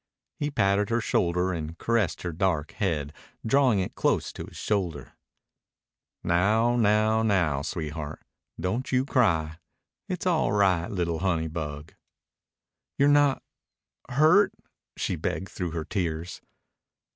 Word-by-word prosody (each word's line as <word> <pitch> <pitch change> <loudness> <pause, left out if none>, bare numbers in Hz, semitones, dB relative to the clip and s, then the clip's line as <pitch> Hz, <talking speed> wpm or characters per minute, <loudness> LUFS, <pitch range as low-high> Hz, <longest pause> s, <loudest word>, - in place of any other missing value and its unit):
He 145 - -1
patted 100 -6 +1
her 115 0 +1
shoulder 90 -3 +1
and 80 0 -5
caressed 115 -7 0
her 85 - -2
dark 80 -3 0
head 75 -8 -2 0.3
drawing 130 -2 +3
it 90 - -4
close - - 0
to - - -7
his - - -12
shoulder. 90 -8 -2 1.1
"Now 110 +7 +2
now 110 -1 +3
now 90 -10 +1
sweetheart, 75 -1 -5 0.3
don't 110 +8 -2
you 130 0 +2
cry. 85 - +1 0.5
It's 180 -1 -3
all 160 - +2
right, 95 -4 +2
li'l' 85 -4 -1
honey 85 -4 0
bug." 75 -1 -6 1.0
"You're 140 +1 +4
not... 145 -2 +3 0.7
hurt," 155 +10 +4 0.4
she - - -1
begged 95 - -3
through 90 -2 -4
her 80 -1 -4
tears. 85 -3 -3
95 Hz, 125 wpm, -27 LUFS, 80-115 Hz, 1.1 s, You're